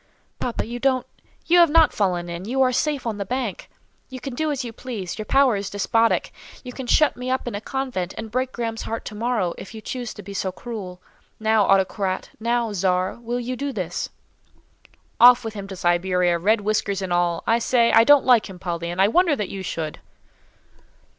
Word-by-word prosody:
"Papa, 245 - -2
you 240 +2 -6
don't—you 270 +6 0
have 340 -2 +7
not 320 0 +5
fallen 180 -4 0
in; 170 +2 -6
you 255 +5 -2
are 255 - +3
safe 280 +1 -1
on 220 -3 -3
the - - -1
bank; 240 -1 -4 0.4
you 260 -1 -7
can 270 0 -6
do 310 +5 -1
as 280 -3 -2
you 230 - -6
please; 220 -6 -6
your 215 - -5
power 270 -4 +4
is 200 0 -3
despotic; 225 +3 +1 0.3
you 250 -1 -8
can 260 -1 -7
shut 305 +4 +4
me 250 +1 -5
up 260 -1 -1
in 240 - -3
a 205 - -4
convent, 250 -9 -3
and 220 -1 -6
break 255 +2 -1
Graham's 230 -2 -4
heart 225 - -5
to - - -6
morrow, 215 -5 -1
if 210 - -10
you - - -6
choose 245 +1 -5
to 205 - -10
be 200 - -8
so 190 -1 -2
cruel. 190 -4 -7 0.4
Now, 220 -1 +3
autocrat, 190 0 +1
now 235 -1 0
czar, 185 +1 0
will 240 +1 -3
you 250 +1 -3
do 280 +2 -3
this?" 180 -7 -4 1.1
"Off 245 0 +8
with 220 - -4
him 200 -2 -7
to 195 - -7
Siberia, 175 0 +1
red 210 +5 +2
whiskers 200 -2 -1
and 180 -2 -2
all; 175 -1 +1
I 230 +1 +3
say, 235 0 +3
I 225 - +7
don't 290 +2 +6
like 240 -5 +4
him, 190 - -9
Polly, 170 -2 -4
and 175 +2 -5
I 195 - +6
wonder 340 - +3
that 210 -7 -3
you 195 - -6
should." 160 -4 -4
220 Hz, 210 wpm, -23 LUFS, 190-250 Hz, 1.1 s, Off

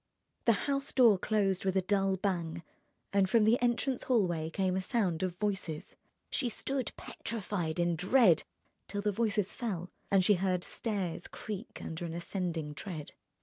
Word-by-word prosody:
The 230 - +6
house 275 -1 0
door 230 -7 +6
closed 195 -3 +1
with 190 0 +1
a - - +4
dull 195 0 +2
bang, 170 -4 -2 0.5
and 195 -1 +3
from 225 +1 +5
the 225 +3 +4
entrance 245 +2 +1
hallway 175 -10 +2
came 185 +2 0
a 190 - 0
sound 185 -4 0
of 185 -2 -1
voices. 195 -6 -3 0.4
She 255 -4 0
stood 265 +2 -2
petrified 185 -7 -3
in 175 -1 +2
dread 190 - +5 0.5
till 200 0 -3
the 210 - +2
voices 210 -2 0
fell 185 -7 -4 0.2
and 190 -2 +4
she 210 - +6
heard 185 -2 +1
stairs 190 -7 -3
creak 215 +1 -7
under 160 +1 -5
an 165 -1 -5
ascending 170 -3 -3
tread. 150 +1 -6
195 Hz, 160 wpm, -32 LUFS, 175-220 Hz, 0.5 s, The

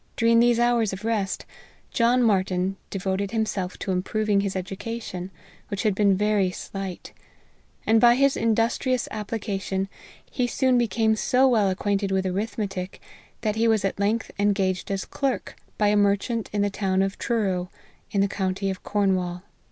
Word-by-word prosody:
During 230 0 +4
these 240 0 +4
hours 235 -3 +2
of 195 +3 -7
rest, 210 -4 -1 0.5
John 245 +2 +3
Martyn 190 -3 +1
devoted 195 0 -2
himself 215 -4 -2
to 195 - -3
improving 200 +2 +1
his 200 -1 -2
education, 190 0 -5 0.4
which 200 -2 -3
had 215 - +2
been 200 -1 +3
very 210 -2 +2
slight; 190 0 -7 0.7
and 225 0 +4
by 240 0 +7
his 275 +1 +3
industrious 230 +3 +1
application, 200 -3 -3 0.4
he 250 -2 -1
soon 255 0 +2
became 220 -1 +2
so 255 +4 +3
well 220 -6 +3
acquainted 200 +1 0
with 190 0 +1
arithmetic, 195 -1 -3 0.4
that 215 -1 -1
he 230 +1 +3
was 220 -3 +2
at 195 - -2
length 215 +3 0
engaged 195 -2 +1
as 195 -1 -2
clerk, 275 -3 -2 0.2
by 210 -1 +3
a 210 - +3
merchant 205 +3 +1
in 205 -1 0
the 205 - 0
town 190 -1 +1
of 195 0 -3
Truro, 190 -6 -1 0.4
in 200 - +1
the 200 - +3
county 195 0 -1
of 190 - -7
Cornwall. 185 -3 0
205 Hz, 160 wpm, -25 LUFS, 190-225 Hz, 0.7 s, by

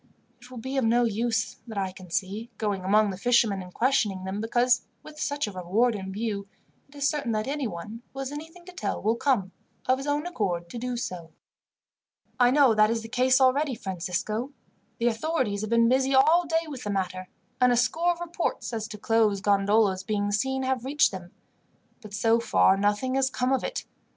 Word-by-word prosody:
It 245 - -14
will 255 - -10
be 260 +4 -4
of 265 - +2
no 235 +2 +3
use, 225 0 -1
that 220 -3 -7
I 190 -1 -1
can 185 -1 -13
see, 200 +7 -3
going 205 -4 -2
among 210 +2 +3
the 190 - -7
fishermen 230 -4 +3
and 180 0 -10
questioning 215 -5 +1
them, 190 +2 -4
because, 245 +2 +2 0.2
with 305 0 -12
such 285 -1 -1
a 210 - -6
reward 195 +7 +1
in 190 -2 -5
view, 205 -1 -3 0.4
it 285 - -19
is 285 -1 +1
certain 280 -7 -1
that 215 0 -1
anyone 230 - -4
who - - -15
has 270 0 -4
anything 325 +4 -9
to 365 - -10
tell 365 - -3
will 220 +2 +1
come, 235 -7 0 0.3
of 255 +1 +2
his 275 - -6
own 290 +2 0
accord, 185 - -2
to 240 - -5
do 250 0 -3
so." 180 -7 -5 1.1
"I 245 -1 +6
know 270 -2 +5
that 215 0 +4
is 230 0 -1
the 225 - -9
case 255 +2 +3
already, 265 +1 +3
Francisco. 200 +6 -3 0.5
The 235 - -2
authorities 235 -3 0
have 215 - -4
been 230 0 +4
busy 265 +2 +2
all 320 +6 +5
day 325 +1 0
with 280 -5 -7
the 210 - -4
matter, 185 -2 -2 0.3
and 250 0 +5
a 245 - +3
score 330 +8 +2
of 345 0 -5
reports 345 -7 -3
as 220 -1 -3
to 210 - -8
closed 215 -2 +1
gondolas 200 -1 +3
being 205 +1 -1
seen 265 +6 0
have 260 -2 -1
reached 290 +3 +3
them; 180 -2 -8 0.7
but 210 -3 -9
so 225 +1 +3
far 195 -4 +4
nothing 205 +6 0
has 270 0 +2
come 255 0 0
of 265 - 0
it. - - -4
230 Hz, 205 wpm, -26 LUFS, 205-265 Hz, 1.1 s, I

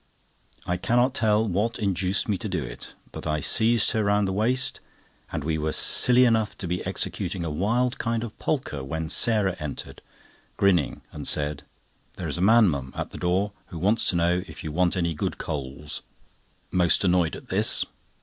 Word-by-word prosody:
I 90 - 0
cannot 120 +7 +2
tell 110 -3 +2
what 105 +5 0
induced 95 -2 0
me 105 - +1
to 110 0 -4
do 90 -5 -1
it, - - -8 0.2
but - - -7
I 75 0 0
seized 110 +9 +2
her 110 - +1
round 105 0 +3
the 95 - -1
waist, 120 +6 +1 0.5
and - - -3
we 80 +1 -1
were 75 0 -1
silly 125 0 +3
enough 110 -3 +2
to 90 - -5
be 90 +1 -2
executing 90 -1 -2
a 80 - -2
wild 120 +10 0
kind 115 -1 -1
of 115 -2 -7
polka 125 - -2
when 80 +4 -4
Sarah 105 -1 +2
entered, 75 -2 -6 0.6
grinning, 90 -7 +2
and - - -4
said: 75 0 -1 0.5
"There - - -5
is - - -2
a - - -1
man, 110 +3 +6
mum, 70 -5 -2
at - - -4
the - - -8
door 95 +4 +1 0.2
who 85 - -8
wants 105 +7 +2
to - - +2
know 85 +1 +2
if - - -10
you 80 - -4
want 90 +3 +2
any 85 -2 +1
good 75 - -3
coals." 70 +1 -5 0.7
Most 90 0 +3
annoyed 90 -3 +2
at - - -11
this. - - +2
95 Hz, 190 wpm, -26 LUFS, 80-110 Hz, 0.7 s, man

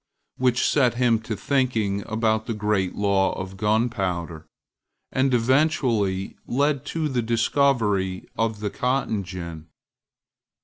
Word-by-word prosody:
which 125 -1 +2
set 125 -5 +3
him 120 -2 +3
to 110 0 -5
thinking 110 -5 0
about 110 0 0
the 115 - -2
great 105 -3 0
law 100 -1 +2
of 95 +1 -6
gunpowder, 95 -7 -1 0.6
and 130 +1 +1
eventually 120 -6 +1
led 140 +1 +1
to 160 -2 -2
the 130 -4 0
discovery 115 -5 +1
of 110 -2 -1
the 105 -2 -2
cotton 125 -5 -1
gin. 85 -3 -7
110 Hz, 120 wpm, -24 LUFS, 95-125 Hz, 0.6 s, set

